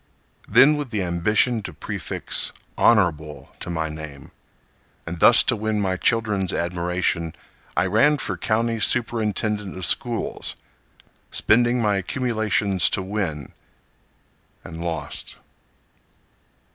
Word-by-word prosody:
Then, 135 +7 +6
with 145 -3 -4
the 105 -4 -2
ambition 105 +7 +1
to - - -8
prefix - - -2 0.2
Honorable 80 -9 +1
to - - -7
my 80 -2 -2
name, 75 -3 -9 0.7
And 85 0 -6
thus - - +7
to - - +2
win 110 0 -2
my 95 -2 0
children's 105 -2 0
admiration, 85 -1 -1 0.4
I - - +3
ran 115 +11 +3
for - - -3
County 115 +1 -1
Superintendent 105 -4 0
of 95 - -3
Schools, 120 - -1 0.7
Spending 120 +1 +2
my 105 -2 +2
accumulations 105 -3 0
to 95 - 0
win—and 85 -2 -9
lost. 85 -1 -5
100 Hz, 105 wpm, -23 LUFS, 85-115 Hz, 0.7 s, thus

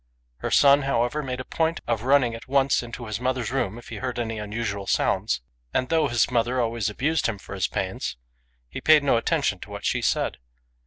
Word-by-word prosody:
Her - - -3
son, 140 0 +6
however, 135 +1 0
made 130 -3 -4
a 130 - -5
point 165 +1 0
of 115 -3 -1
running 130 -1 +3
at 115 - -9
once 135 0 +3
into 120 0 -7
his 110 0 -4
mother's 125 -2 -1
room 120 -6 -1
if 120 - -12
he - - -6
heard 130 -2 -4
any 115 -2 -2
unusual 105 -2 -3
sounds; 60 0 +1 0.3
and 130 0 +1
though 165 -1 +3
his 120 0 +1
mother 120 +1 +1
always 115 -2 0
abused 150 +9 0
him 115 -3 -2
for 100 - -10
his 95 -2 0
pains, 95 -10 -3 0.5
he - - -7
paid 155 -2 +6
no 140 - +3
attention 115 - 0
to - - -10
what - - -7
she - - +1
said. - - 0
120 Hz, 210 wpm, -25 LUFS, 110-135 Hz, 0.5 s, son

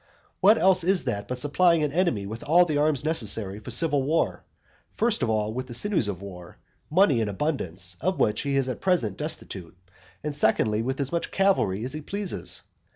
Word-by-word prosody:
What 210 +4 +5
else 185 -1 +4
is 185 +1 +1
that 100 0 -3
but 125 - -4
supplying 160 +5 +2
an 150 - -1
enemy 155 - 0
with 110 +3 -7
all 175 +4 +4
the 150 -4 -1
arms 150 -2 +1
necessary 110 -9 +1
for 110 - -10
civil 145 +3 +2
war; 155 +5 -1 0.5
first 230 -1 +1
of 120 - 0
all 110 -1 -1
with 130 +2 -5
the 120 - -5
sinews 190 - +1
of 100 -1 -5
war, 90 -3 -11 0.3
money 155 - +3
in 110 - -1
abundance, 95 - -2
of 185 +6 0
which 105 0 +1
he 140 -1 -2
is 135 -1 +1
at 130 - -5
present 170 - +1
destitute, 90 -1 -5 0.5
and 150 -1 -3
secondly, 110 -4 +1
with 130 +4 -3
as 140 -1 -2
much 170 - -2
cavalry 190 - +1
as 130 +2 -3
he 155 - -5
pleases? 200 +4 -3
135 Hz, 200 wpm, -25 LUFS, 105-170 Hz, 0.5 s, What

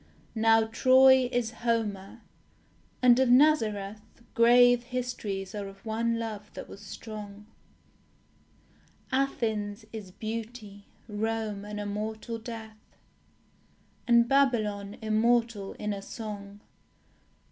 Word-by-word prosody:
Now 225 0 +4
Troy 260 +2 +5
is 240 -3 -1
Homer; 215 -5 -2 0.8
and 245 0 +6
of 260 -2 +3
Nazareth 220 -7 +3 0.3
Grave 245 +1 +5
histories 230 -6 -4
are 205 -2 -5
of 195 +2 -14
one 230 +1 0
love 215 -2 -6
that - - -7
was 195 - -12
strong; 210 -2 -9 1.7
Athens 220 -5 -1
is 215 -4 -7
beauty; 215 0 -7 0.2
Rome 215 -1 -3
an 210 0 -6
immortal 215 +3 -4
death; 220 -1 -10 1.1
And 235 -1 +5
Babylon 215 -7 +1
immortal 220 -1 +1
in 210 0 -3
a 200 - -6
song.... 205 -1 -8
220 Hz, 100 wpm, -28 LUFS, 205-240 Hz, 1.7 s, and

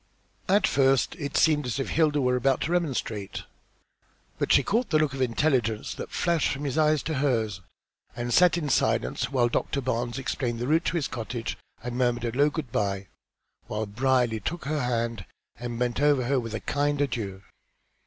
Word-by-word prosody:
At 195 +1 +4
first 135 -2 +3
it 145 -2 -2
seemed 150 -4 +3
as 125 +3 -2
if 135 - -2
Hilda 155 -2 +2
were 125 -1 +2
about 135 +1 +1
to 160 - -1
remonstrate. 130 - -2 1.0
But - - 0
she 140 - +6
caught 230 - 0
the 155 - +3
look 155 -3 +1
of 135 - -4
intelligence 120 -3 +1
that - - -7
flashed 170 -3 +1
from 140 +1 -4
his 140 -2 -2
eyes 155 -2 +3
to 160 - -2
hers, 110 -9 0 0.5
and 120 0 -3
she - - +3
sat 175 -1 +5
in 155 -4 -2
silence - - +1
while 125 -3 +3
Doctor 130 +3 -1
Barnes 120 -2 -2
explained 125 -2 -2
the 120 - -3
route 160 +5 +2
to 170 - 0
his 150 - -1
cottage 115 0 -4 0.3
and 120 +1 -4
murmured 120 -1 +1
a 115 0 -3
low 145 +2 +4
good 150 -5 -5
bye, 100 -2 -1 0.6
while 110 +1 -2
Brierly 120 +1 +1
took 170 - -4
her 150 +1 -1
hand 115 -4 -1 0.4
and 120 -1 -4
bent 125 +2 -1
over 145 -3 +4
her 135 +2 +1
with 115 -2 -5
a - - -2
kind 145 0 0
adieu. 110 -8 -2
130 Hz, 195 wpm, -27 LUFS, 120-145 Hz, 1.0 s, she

